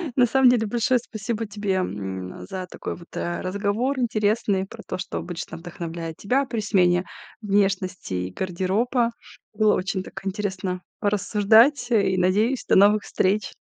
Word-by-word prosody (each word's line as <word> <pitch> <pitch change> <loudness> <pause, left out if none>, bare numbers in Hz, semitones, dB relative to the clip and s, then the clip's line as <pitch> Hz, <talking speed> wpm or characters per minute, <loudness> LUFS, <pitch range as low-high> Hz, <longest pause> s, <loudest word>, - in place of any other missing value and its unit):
На 250 - +5
самом 260 +1 +5
деле 235 -3 +3
большое 240 +3 +2
спасибо 225 0 -4
тебе, 205 -2 -2
м, 95 - -4
за 185 -1 -4
такой - - -5
вот, 170 0 -14
э, 175 - -3
разговор 205 +8 -1
интересный, 215 -4 +1
про - - -11
то, - - -5
что 180 - -4
обычно 175 -1 -6
вдохновляет 165 -1 -6
тебя 260 +7 +1
при 235 -3 -3
смене 180 -3 +2 0.4
внешности 195 - 0
и 90 0 -3
гардероба. 195 - 0 0.4
Было 215 -1 +3
очень 190 +1 -2
так 195 - -10
интересно 190 -2 -3 0.2
порассуждать, 220 +6 +3
э, 200 -4 +3
и, - - 0
надеюсь, 210 +8 +2
до - - +4
новых 205 +2 +5
встреч. 195 +2 0
200 Hz, 155 wpm, -24 LUFS, 185-225 Hz, 0.4 s, На